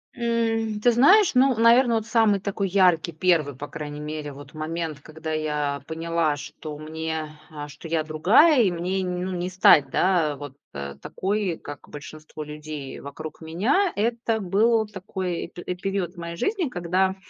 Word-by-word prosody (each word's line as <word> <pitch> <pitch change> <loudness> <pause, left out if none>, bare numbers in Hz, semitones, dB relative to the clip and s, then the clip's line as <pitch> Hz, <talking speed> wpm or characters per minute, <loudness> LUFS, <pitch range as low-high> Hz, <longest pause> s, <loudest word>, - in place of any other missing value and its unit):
М, 225 -2 0
ты 240 +3 +4
знаешь, 355 - +6
ну, 260 0 +5
наверное, 235 +1 +5
вот 220 - -3
самый 220 -4 +3
такой 200 0 -2
яркий, 180 -3 +3
1, 160 -4 +1
по 145 +3 -7
крайней 150 -2 -7
мере, 150 -1 -5
вот 140 +1 -12
момент, 155 -1 -4
когда 160 +1 -7
я 150 -2 -1
поняла, 165 -1 0
что 150 +1 -8
мне 155 0 -5
э, 145 -1 -7
что 145 +3 -11
я 160 -1 0
другая, 205 - +5
и 190 - +2
мне 180 +3 -2
н 180 0 -2
ну 190 - -3
не 180 +1 -2
стать, 160 -6 +5
да, 170 -5 +2
вот, 145 -2 -9 0.2
э, 70 0 -6
такой, 195 -3 -2
как 145 -1 -10
большинство 155 +1 -9
людей 150 -2 -7
вокруг 155 +3 -8
меня. 225 - +1
Это 230 +1 0
был 220 +3 +2
такой 190 -3 -4
пере 180 +1 -5
период 190 -1 -3
моей 170 0 -6
жизни, 375 - -1
когда, 185 -1 0
170 Hz, 165 wpm, -24 LUFS, 155-210 Hz, 0.2 s, знаешь